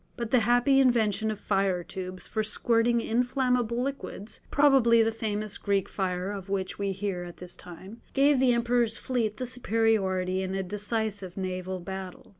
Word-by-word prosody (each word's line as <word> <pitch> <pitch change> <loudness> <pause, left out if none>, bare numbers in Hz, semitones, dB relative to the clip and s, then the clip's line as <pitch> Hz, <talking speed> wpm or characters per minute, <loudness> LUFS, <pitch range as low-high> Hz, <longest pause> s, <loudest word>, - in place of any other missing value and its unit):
But 235 -2 -4
the 255 - +5
happy 245 +5 +4
invention 220 -4 +2
of 215 -2 -3
fire 195 -3 0
tubes 185 +1 -7
for 220 - -2
squirting 230 +2 +2
inflammable 245 0 +1
liquids 265 -6 -6
(probably 265 -6 +5
the 225 - +1
famous 215 -2 -3
"Greek 200 -2 0
fire" 185 0 -2
of 195 -1 -7
which 195 -1 -2
we 200 -1 -1
first 190 +1 -9
hear 195 -3 -2
at 175 -1 -9
this 180 -1 -8
time), 190 +6 -11
gave 280 0 +4
the 260 -1 +4
Emperor's 235 -1 +1
fleet 225 -5 -1
the 255 - -3
superiority 210 -6 +1
in 190 0 -3
a 195 - -1
decisive 205 -1 -3
naval 185 0 -3
battle. 190 0 -7
215 Hz, 170 wpm, -28 LUFS, 190-235 Hz, -, the